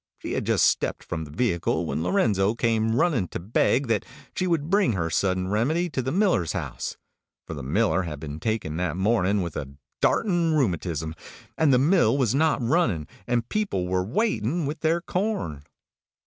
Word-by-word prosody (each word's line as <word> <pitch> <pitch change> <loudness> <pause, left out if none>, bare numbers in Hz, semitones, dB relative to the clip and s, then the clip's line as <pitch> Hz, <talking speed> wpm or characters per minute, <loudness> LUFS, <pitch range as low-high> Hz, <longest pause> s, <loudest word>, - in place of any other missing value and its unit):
She - - -6
had - - -2
just - - +4
stepped - - 0
from 80 -2 -4
the - - -12
vehicle 85 -4 0
when 80 - -2
Lorenzo 95 +4 +2
came 115 -1 +1
running 145 - +2
to - - -5
beg 115 +8 +1
that 115 -4 0 0.3
she 185 - 0
would 160 -4 0
bring 195 - +3
her 85 -4 -2
Sudden 95 +1 0
Remedy 150 - 0
to 130 - -1
the 130 +1 -2
miller's 180 - +2
house, - - -4 0.5
for - - -6
the 75 - -6
miller 95 - +1
had 80 -5 -5
been 75 0 -6
taken 110 -8 -2
that 90 -2 -1
morning 100 -1 +2
with 85 -3 -5
the 70 0 -6 0.3
darting 175 -6 +2
rheumatism, 85 - -1 0.4
and 160 -3 +3
the 125 - +5
mill 140 - +3
was 125 -5 +2
not 150 -2 +2
running, 115 - +1 0.2
and 120 -1 0
people 205 - -1
were 90 0 0
waiting 140 - 0
with 150 +3 -4
their 165 +2 +1
corn. 180 - -2
110 Hz, 180 wpm, -25 LUFS, -, 0.5 s, the